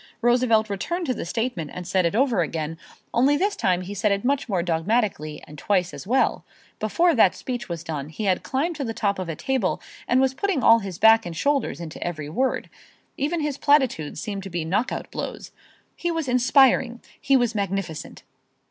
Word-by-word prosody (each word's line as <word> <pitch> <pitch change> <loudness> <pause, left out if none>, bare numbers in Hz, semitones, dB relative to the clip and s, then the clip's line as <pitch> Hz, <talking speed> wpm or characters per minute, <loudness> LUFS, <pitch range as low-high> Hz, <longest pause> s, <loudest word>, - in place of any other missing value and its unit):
Roosevelt 240 -2 +3
returned 340 - -3
to 260 - 0
the - - -5
statement 225 - -2
and 180 - -7
said 185 -1 +2
it 170 - -3
over 240 -6 +2
again, 160 0 -3 0.3
only 275 +4 +4
this 405 +5 0
time 180 -1 +1
he 185 +2 -6
said 205 +1 +1
it 200 +3 -1
much 275 -1 0
more 185 -4 0
dogmatically 170 -2 -1
and 150 -1 -12
twice 185 -1 0
as - - -9
well. 260 +4 +2 0.4
Before 335 +11 +2
that 220 -8 +4
speech 245 -5 -5
was 170 -2 -4
done 150 -3 -5
he 190 +7 -6
had 190 -3 +1
climbed 315 +6 -1
to 285 - -2
the 225 -3 -4
top 200 -4 0
of 185 -2 -4
a 165 - -3
table 255 - -1 0.3
and 250 - +3
was 265 0 +2
putting 325 -2 -1
all 230 0 +7
his 195 -5 -6
back 225 +2 +6
and 170 -4 -7
shoulders 280 - 0
into 165 -2 -6
every 155 -4 -4
word. 255 +11 -1 0.5
Even 310 +4 -1
his 295 -2 -2
platitudes 260 - +2
seemed 200 -1 -4
to 195 - -8
be 170 -3 -3
knockout 205 +9 -2
blows. - - -6 0.4
He 345 - -2
was 325 -4 -2
inspiring. 250 -1 +4 0.2
He 275 -2 +4
was 240 -3 +1
magnificent. 195 -6 -4
220 Hz, 200 wpm, -24 LUFS, 180-260 Hz, 0.5 s, all